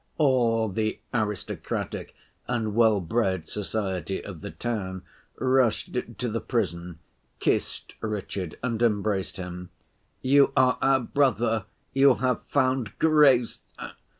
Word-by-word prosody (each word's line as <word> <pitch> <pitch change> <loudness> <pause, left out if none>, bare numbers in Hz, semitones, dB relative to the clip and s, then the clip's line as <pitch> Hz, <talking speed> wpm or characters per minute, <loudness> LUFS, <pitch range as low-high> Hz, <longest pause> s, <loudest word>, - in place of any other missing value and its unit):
All 120 -6 +3
the 110 +2 -1 0.2
aristocratic 105 -4 -3 0.3
and 115 -4 -1
well‐bred 105 -4 +2
society 95 -2 -3
of 90 -6 -8
the - - -6
town 95 0 -4 0.4
rushed 130 -2 +1 0.2
to 125 - -2
the 115 0 -2
prison, 90 -7 -2 0.4
kissed - - -1
Richard 100 -5 -4
and 115 -3 -1
embraced 105 -4 0
him; 90 -1 -7 0.5
'You 140 +1 +5
are 130 -1 +4
our 135 -1 +4
brother, 115 -5 +1 0.3
you 135 -1 +6
have 125 -2 0
found 130 -6 0
grace. 145 -7 +4
115 Hz, 110 wpm, -26 LUFS, 95-130 Hz, 0.5 s, you